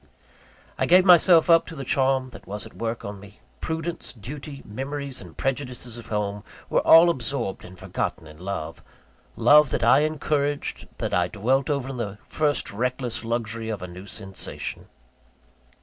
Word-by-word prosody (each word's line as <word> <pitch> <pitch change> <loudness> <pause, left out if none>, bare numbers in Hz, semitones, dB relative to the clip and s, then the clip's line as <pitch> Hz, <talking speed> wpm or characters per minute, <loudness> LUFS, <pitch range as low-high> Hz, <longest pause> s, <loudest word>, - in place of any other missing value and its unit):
I - - +1
gave 180 +2 +6
myself 175 -2 +7
up 165 -1 +5
to 165 - -8
the 135 - -5
charm 130 0 +1
that - - -13
was 105 +1 -5
at - - -12
work 115 0 -4
on 100 0 -6
me. 105 +1 -15 0.2
Prudence, 160 +1 -3
duty, 135 +5 -9
memories 135 +4 -5
and - - -13
prejudices 125 -3 -3
of 120 - -10
home, 105 -1 -2 0.3
were - - +4
all 170 +1 +8
absorbed 125 - -2
and 90 +1 -12
forgotten 85 - -3
in 75 0 -13
love 90 -4 -5 0.5
love 145 +5 +6
that - - -1
I 120 +4 +6
encouraged, 145 -1 -1
that - - -3
I 90 0 +2
dwelt 125 +8 0
over 140 -3 -1
in 135 - -5
the 105 -4 -4
first 150 -8 -1
reckless 125 +2 -2
luxury 115 -1 -3
of 105 -4 -4
a - - -5
new 90 +3 -10
sensation. 95 -1 -5
125 Hz, 165 wpm, -25 LUFS, 105-145 Hz, 0.5 s, all